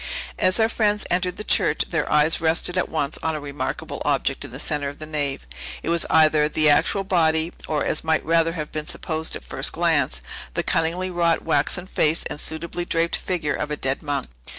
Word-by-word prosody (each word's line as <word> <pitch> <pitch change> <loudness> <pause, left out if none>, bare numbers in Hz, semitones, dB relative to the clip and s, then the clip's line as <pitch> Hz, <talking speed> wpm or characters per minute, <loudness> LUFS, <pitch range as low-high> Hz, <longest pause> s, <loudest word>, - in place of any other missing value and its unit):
As 185 +3 +3
our 220 - +5
friends 210 -2 +1
entered 180 0 0
the - - -4
church, 180 -8 +2
their 160 -3 -1
eyes 150 +2 +4
rested 165 +2 +2
at 185 - 0
once 150 -2 -1
on 160 -1 -1
a - - -3
remarkable 140 -1 -4
object 140 -1 0
in 145 - -7
the 125 +3 -9
centre 145 -2 +1
of 145 - -10
the 155 - -7
nave. 145 - -2 0.4
It - - -2
was 170 0 +1
either 155 -1 +4
the 155 -1 +4
actual 195 +7 +2
body, 165 -3 +2
or, 150 -2 0
as 155 - 0
might 160 0 +1
rather 165 +1 +3
have 155 -3 -5
been 155 0 -4
supposed 160 -1 -3
at - - -8
first 135 +1 -1
glance, 150 - +1 0.3
the - - 0
cunningly 175 +3 0
wrought 170 -2 +1
waxen 160 +5 0
face 160 -3 +1
and 150 - -5
suitably 170 +2 -3
draped 165 0 0
figure 170 -5 -2
of 150 - -3
a 150 - -3
dead 135 0 -2
monk. 145 -3 -2
160 Hz, 205 wpm, -23 LUFS, 150-170 Hz, 0.4 s, our